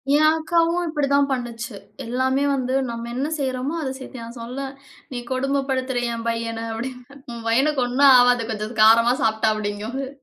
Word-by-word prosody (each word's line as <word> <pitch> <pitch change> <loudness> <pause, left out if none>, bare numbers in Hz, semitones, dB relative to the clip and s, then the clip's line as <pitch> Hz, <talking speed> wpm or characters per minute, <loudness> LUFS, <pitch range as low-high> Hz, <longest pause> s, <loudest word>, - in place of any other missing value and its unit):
என் 310 +1 +5
அக்காவும் 335 +2 +1
இப்டித்தான் 285 -3 +1
பண்ணுச்சு. 235 -2 -5 0.3
எல்லாமே 260 +3 0
வந்து 255 -1 -2 0.2
நம்ம 235 0 -5
என்ன 270 +3 -1
செய்றமோ, 260 +1 -2
அத 275 - -2
சேத்து 260 0 -9
நான் 230 +1 -9
சொல்வேன், 265 +4 -6 0.4
"நீ 245 - -3
கொடும 275 +2 0
படுத்துற 260 -1 -1 0.2
என் 230 0 -5
பையன." 230 0 -2
அப்டின்னு, 250 +3 -7 0.2
"உன் 230 -1 -8
பையனுக்கு 265 +4 +2
ஒண்ணும் 270 +3 +5
ஆவாது. 245 -1 +4
கொஞ்சம் 215 +1 -5
காரமா 230 +2 +6
சாப்ட்டான்" 220 0 +2
அப்டிங்கும், 210 +3 -4
அது. 275 -1 -3
250 Hz, 165 wpm, -22 LUFS, 230-275 Hz, 0.4 s, காரமா